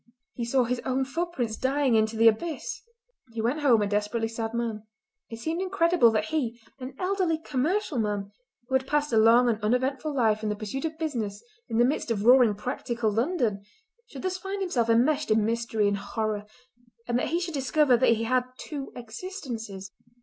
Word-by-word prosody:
he 240 - -4
saw 250 +2 +2
his 245 +1 -1
own 265 0 0
footprints 275 -6 -2
dying 270 -1 +1
into 220 0 +2
the 230 +1 +6
abyss! 295 +9 0 0.5
He 230 - -5
went 240 +7 0
home 245 -8 +4
a - - 0
desperately 210 +3 -1
sad 225 0 -4
man. 230 -2 -3 0.5
It 225 - -7
seemed 320 +9 -3
incredible 350 -8 +3
that 215 -1 0
he, 240 -7 -1 0.2
an 255 +1 -7
elderly 365 -3 0
commercial 310 - -1
man, 205 -2 -2 0.4
who 260 - -7
had 265 0 +2
passed 295 -2 0
a 220 - +5
long 230 +3 +6
and 225 -2 0
uneventful 260 +6 0
life 220 -6 +2
in 215 - -2
the 210 - -1
pursuit 215 +8 -4
of 315 0 -4
business 235 -11 -3 0.3
in 225 - -1
the 240 - +5
midst 265 -1 -1
of 215 -2 -1
roaring, 245 -3 +6
practical 235 0 -2
London, 230 - 0 0.5
should 270 - -10
thus 370 0 -2
find 390 +1 -4
himself 265 -12 0
enmeshed 270 +6 +3
in 215 -1 +3
mystery 225 -2 0
and 200 0 +1
horror, 215 0 -3 0.6
and 240 0 +1
that - - -1
he 335 - +1
should 350 -2 -4
discover 275 -1 +3
that 235 -1 +4
he 225 - -3
had 250 +2 +1
two 285 -3 -6
existences. 230 - -7
245 Hz, 190 wpm, -27 LUFS, 220-295 Hz, 0.6 s, the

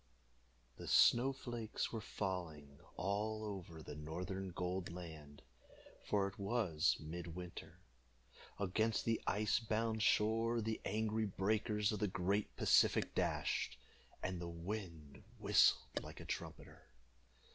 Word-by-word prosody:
The - - -8
snow 125 +3 +6
flakes 120 -4 -3
were 115 - -2
falling 85 -9 -4 0.2
all 105 +4 -1
over 90 -6 -6
the - - -7
northern 90 +5 -4
Gold 90 0 -3
Land, 80 -5 -9 0.6
for 100 -2 +1
it 100 +1 -9
was 100 -7 +2
mid 85 +3 -6
winter. 90 +1 -8 0.8
Against 110 +3 +1
the 115 -1 +1
ice 105 +2 +2
bound 110 0 0
shore 115 +3 +3
the 110 0 -2
angry 110 +1 0
breakers 105 +2 +1
of 105 - -2
the 105 - +2
great 100 +3 0
Pacific - - +4
dashed, - - 0 0.5
and 90 -1 -2
the 85 - -4
wind 85 -4 -6
whistled - - +4
like - - -9
a - - -8
trumpeter. - - -6
100 Hz, 125 wpm, -38 LUFS, 85-110 Hz, 0.8 s, snow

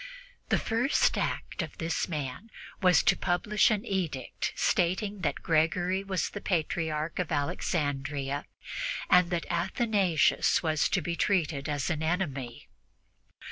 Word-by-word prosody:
The - - +3
first 240 +5 +2
act - - -2
of - - -6
this 165 -2 -1
man 150 - -5 0.3
was 180 -2 +5
to - - +4
publish 190 +4 +2
an 215 0 0
edict 170 - -2
stating 190 +3 0
that - - -2
Gregory 175 +4 +1
was 190 -5 -2
the 205 - -6
Patriarch 160 -2 -1
of 180 -2 -2
Alexandria 145 -2 -1 0.7
and 180 -2 +6
that 175 -1 -1
Athanasius 190 -1 +2
was 155 -2 +1
to 185 - +1
be 170 +2 -2
treated 160 -8 0
as 145 +3 -1
an 155 -2 -2
enemy. 145 -8 -2
170 Hz, 130 wpm, -29 LUFS, 150-190 Hz, 0.7 s, and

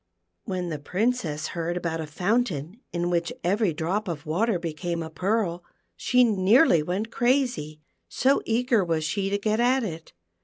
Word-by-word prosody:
When 185 -4 -3
the 155 -2 -4
Princess 180 - -1
heard 170 +1 -3
about 165 -2 -2
a 155 - -5
fountain 185 - -1
in 175 0 -1
which 170 -1 0
every 200 +2 +2
drop 180 +7 -2
of 160 -5 -5
water 190 +7 +1
became 170 0 -3
a 160 - -8
pearl 185 -1 -1 0.3
she 250 -1 +3
nearly 210 - +4
went 190 +8 -3
crazy, 240 - 0 0.3
so 270 +2 +2
eager 230 -2 +2
was 165 -2 -1
she 195 +4 -1
to 200 - +1
get 215 +2 0
at 255 +2 +3
it. 165 -6 -6
180 Hz, 160 wpm, -26 LUFS, 165-225 Hz, 0.3 s, nearly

